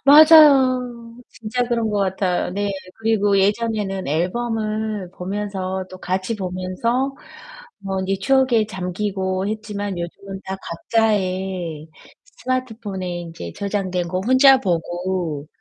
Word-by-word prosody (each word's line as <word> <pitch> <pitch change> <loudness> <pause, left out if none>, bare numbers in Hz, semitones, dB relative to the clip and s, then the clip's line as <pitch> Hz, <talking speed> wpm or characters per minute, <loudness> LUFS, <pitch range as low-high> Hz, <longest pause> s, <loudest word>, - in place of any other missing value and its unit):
맞아요. 265 -6 +6
진짜 225 +3 -3
그런 235 -2 0
거 210 - 0
같아요. 190 -2 0
네. 200 +2 -1 0.3
그리고 210 -3 +2
예전에는 205 -1 0
앨범을 215 +4 -2
보면서 190 0 -3
또 185 - -10
같이 185 +5 -2
보면서 195 +8 -2 0.6
뭐 195 -1 -3
이제 195 0 0
추억에 260 -3 +3
잠기고 190 0 -2
했지만 205 -3 -4
요즘은 190 +3 -7
다 190 0 -4
각자의 185 -5 -1 0.4
스마트폰에 225 -7 -4
인제 165 - -8
저장된 190 -3 -2
거 185 +1 -1
혼자 265 +1 +7
보고 175 - -2
200 Hz, 250 characters per minute, -21 LUFS, 185-230 Hz, 0.6 s, 혼자